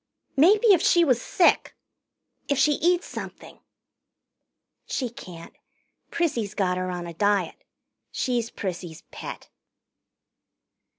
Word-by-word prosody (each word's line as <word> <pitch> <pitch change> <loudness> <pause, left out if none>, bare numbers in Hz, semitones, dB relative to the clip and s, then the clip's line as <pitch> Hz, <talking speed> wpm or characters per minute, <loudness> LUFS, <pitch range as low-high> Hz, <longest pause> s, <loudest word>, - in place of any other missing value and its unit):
"Maybe 405 - +6
if 360 - +3
she 345 -1 +4
was 250 -5 +2
sick 350 - +2 0.7
if 285 - 0
she 285 +3 +4
eats 350 +4 +1
something - - -9 0.7
" - - -58
"She 250 -4 -2
can't. 175 -7 -11 0.5
Prissy's 235 - -1
got 180 -3 0
her 185 0 -2
on 175 -1 -4
a 170 - -7
diet. 200 0 0 0.5
She's 240 -3 -1
Prissy's 175 -6 -6
pet." - - -8
230 Hz, 115 wpm, -25 LUFS, -, 0.7 s, Maybe